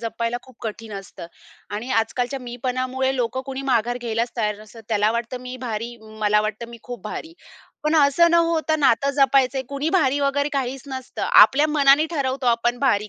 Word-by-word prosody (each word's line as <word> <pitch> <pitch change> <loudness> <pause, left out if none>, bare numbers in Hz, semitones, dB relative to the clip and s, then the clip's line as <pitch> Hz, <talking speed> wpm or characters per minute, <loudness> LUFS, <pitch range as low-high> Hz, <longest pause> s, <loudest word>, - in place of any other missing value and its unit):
जपायला 230 +1 -2
खूप 260 -3 -18
कठीण 220 0 -6
असतं 190 -2 -10 0.5
आणि 235 +5 -5
आजकालच्या 245 +4 -3
मीपणामुळे 255 +2 -2
लोकं 250 +1 -1
कुणी 270 0 -4
माघार 240 +2 +1
घ्यायलाचं 235 0 -2
तयार 210 -1 0
नसतात. 220 +1 -13
त्याला 215 -1 +2
वाटतं 235 +2 -3
मी 250 0 -7
भारी. 230 +2 -4 0.2
मला 210 0 +3
वाटतं 215 +2 -4
मी 235 -1 -11
खूप 245 -5 -8
भारी. 320 +9 -6 0.5
पण 305 +1 +1
असं 305 +4 +5
न - - +2
होतं 330 -2 +2
नातं 275 +1 +3
जपायचयं 270 -1 +3
कुणी 280 +2 -2
भारी 285 -7 +2
वगैरे 285 +1 +1
काहीचं 270 0 -3
नसतं. 260 -1 -7
आपल्या 290 +3 +6
मनाने 290 +1 +4
ठरवतो, 270 -4 -2
आपण 240 +1 +1
भारी 215 -6 +1
250 Hz, 175 wpm, -22 LUFS, 230-275 Hz, 0.5 s, आपल्या